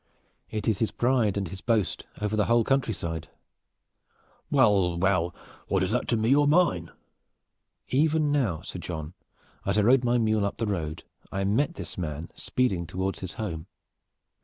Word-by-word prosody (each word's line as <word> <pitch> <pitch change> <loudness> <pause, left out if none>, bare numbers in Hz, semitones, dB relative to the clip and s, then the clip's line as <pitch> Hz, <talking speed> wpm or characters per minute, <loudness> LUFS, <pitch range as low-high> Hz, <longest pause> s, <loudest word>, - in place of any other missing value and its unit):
It 110 -2 -3
is 110 -4 +2
his 110 - +1
pride 120 -3 +1
and 100 -2 -1
his 95 +1 -8
boast 110 -8 0
over 105 0 -1
the 105 -1 +2
whole 115 0 +4
countryside." 105 -11 -1 1.2
"Well, 95 -5 +4
well, 90 -1 +2
and 85 - -7 0.3
what 95 -1 +1
is 95 - -1
this 125 - +2
to 115 - +2
me 115 +5 +3
or 145 0 +4
mine?" 145 - +3 1.0
"Even 150 +2 +2
now, 110 - 0
Sir 90 - -6
John, 80 -2 -5 0.5
as 100 +1 0
I 105 - +4
rode 125 +4 +5
my 120 0 +3
mule 110 -2 +2
up 100 - -2
the 115 - -1
road 80 -6 -3 0.3
I 95 0 -1
met 135 - +1
this - - -6
man 80 -1 -4
speeding 95 -10 -1
toward 95 +2 -2
his 95 -2 -6
home. 85 -8 -5
105 Hz, 170 wpm, -27 LUFS, 90-120 Hz, 1.2 s, rode